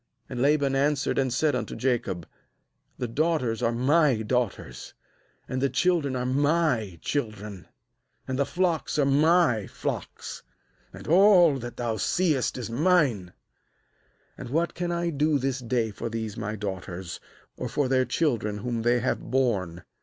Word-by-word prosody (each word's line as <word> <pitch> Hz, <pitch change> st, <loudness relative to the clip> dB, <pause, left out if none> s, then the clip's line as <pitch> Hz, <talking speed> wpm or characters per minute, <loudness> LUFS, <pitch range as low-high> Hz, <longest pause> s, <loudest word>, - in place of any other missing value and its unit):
^And 120 Hz, -, -3 dB
Laban 140 Hz, 0 st, +3 dB
an 140 Hz, +2 st, +3 dB
swered 140 Hz, -1 st, -1 dB
and 130 Hz, -2 st, +1 dB
said 145 Hz, +5 st, +1 dB
unto 115 Hz, -4 st, -3 dB
Jacob: 105 Hz, -10 st, -1 dB, 0.7 s
'The 125 Hz, -, -3 dB
daughters 135 Hz, -4 st, 0 dB
are 115 Hz, -, +2 dB
my 130 Hz, 0 st, +2 dB
daughters, 110 Hz, -, -3 dB, 0.5 s
and 130 Hz, 0 st, -3 dB
the 140 Hz, -, +2 dB
children 150 Hz, -1 st, +1 dB
are 125 Hz, 0 st, -2 dB
my 135 Hz, -, +1 dB
children, 105 Hz, -8 st, -4 dB, 0.6 s
and 130 Hz, +1 st, -2 dB
the 140 Hz, -, +3 dB
flocks 175 Hz, -5 st, 0 dB
are 145 Hz, -, +3 dB
my 145 Hz, -, +3 dB
flocks, -, -, -5 dB, 0.5 s
and -, -, -11 dB
all 175 Hz, -4 st, +6 dB
that 120 Hz, 0 st, -7 dB
thou 115 Hz, -2 st, -2 dB
seest 155 Hz, -7 st, +1 dB
is 125 Hz, -, -4 dB
mine; 135 Hz, -, +2 dB, 1.1 s
and 120 Hz, -, -7 dB
what 165 Hz, +6 st, 0 dB
can 175 Hz, 0 st, -3 dB
I 170 Hz, 0 st, -1 dB
do 150 Hz, 0 st, +2 dB
this 135 Hz, 0 st, -1 dB
day 120 Hz, -2 st, -1 dB
for 115 Hz, +3 st, -5 dB
these* 110 Hz, -2 st, -4 dB
my 110 Hz, -1 st, -4 dB
daughters, 95 Hz, -3 st, -6 dB, 0.4 s
or -, -, -5 dB
for 145 Hz, -2 st, 0 dB
their 130 Hz, 0 st, +3 dB
children 120 Hz, -6 st, 0 dB
whom 115 Hz, +2 st, -3 dB
they 120 Hz, +1 st, +2 dB
have 130 Hz, -, 0 dB
borne? 100 Hz, -10 st, -1 dB
130 Hz, 155 wpm, -26 LUFS, 115-150 Hz, 1.1 s, all